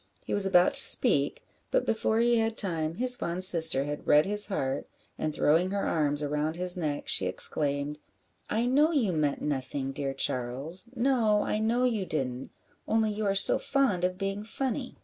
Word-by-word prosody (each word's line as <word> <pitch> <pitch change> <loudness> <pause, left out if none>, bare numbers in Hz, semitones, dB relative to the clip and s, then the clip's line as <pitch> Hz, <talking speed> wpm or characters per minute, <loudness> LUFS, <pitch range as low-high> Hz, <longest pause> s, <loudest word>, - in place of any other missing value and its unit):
He - - -5
was 200 -1 +3
about 180 -2 +3
to - - +9
speak, - - +5 0.3
but - - -1
before 220 0 -1
he 240 0 +2
had 225 0 -2
time, 165 -5 -2
his 250 +3 +1
fond 175 -4 -4
sister 160 -6 +5
had 145 +1 -7
read 150 +1 +4
his 205 +1 +4
heart, 135 -10 -4 0.3
and 155 - -4
throwing 165 +5 +1
her 200 0 -3
arms 150 -2 -1
around 150 +2 -3
his 180 0 -1
neck, 150 -5 -5
she 95 - +3
exclaimed 145 +8 +1 0.5
"I 225 +3 -1
know 290 +6 +2
you 250 - 0
meant 150 -4 -2
nothing, 135 -1 -4
dear 135 -1 -5
Charles; 135 - -2
no, 230 -4 +1
I 215 - -3
know 230 +3 -1
you 220 -7 -1
didn't; 130 -4 -5 0.4
only 220 -1 0
you 210 0 -4
are 195 - -1
so 195 - +4
fond 265 -11 -1
of 180 0 -2
being 195 +1 -4
funny." 255 +3 -5
180 Hz, 185 wpm, -27 LUFS, 150-220 Hz, 0.5 s, to